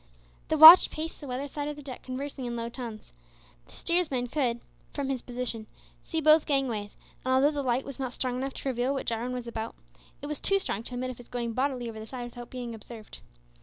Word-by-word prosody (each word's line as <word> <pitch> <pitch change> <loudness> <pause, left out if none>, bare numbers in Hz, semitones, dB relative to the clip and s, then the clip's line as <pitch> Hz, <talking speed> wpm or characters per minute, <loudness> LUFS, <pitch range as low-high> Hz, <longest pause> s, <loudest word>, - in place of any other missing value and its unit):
The 315 - +1
watch 320 +4 +12
paced 320 +2 -6
the 290 - -8
weather 260 +3 -3
side 290 +1 -4
of 295 - -4
the 295 - -11
deck 260 -3 -8
conversing 265 +1 -5
in 240 -1 -3
low 230 0 -3
tones. 235 - -8 0.5
The - - -18
steersman 300 -8 0
could, 240 -4 0 0.4
from 280 -2 -2
his 265 -3 -2
position, 240 -3 -3 0.3
see 325 -1 -3
both 310 0 +5
gangways, 245 -8 -1 0.3
and 260 - -1
although 265 +3 +4
the 290 -2 -2
light 255 0 0
was 275 -2 -8
not 260 -2 -2
strong 250 0 -2
enough 270 +1 -4
to 275 - -3
reveal 255 +2 0
what 270 - -3
Jarwin 235 +2 -2
was 250 -1 -4
about, 225 -1 -5 0.4
it - - -8
was 300 0 -4
too 395 - +2
strong 300 - -3
to 250 - -6
admit 255 +1 -3
of 250 - -10
his 245 - -13
going 235 -2 -3
bodily 255 -1 -1
over 220 -1 -7
the 220 - -8
side 250 0 -6
without 240 0 -9
being 245 -2 -6
observed. 220 0 -11
255 Hz, 230 wpm, -28 LUFS, 240-280 Hz, 0.5 s, watch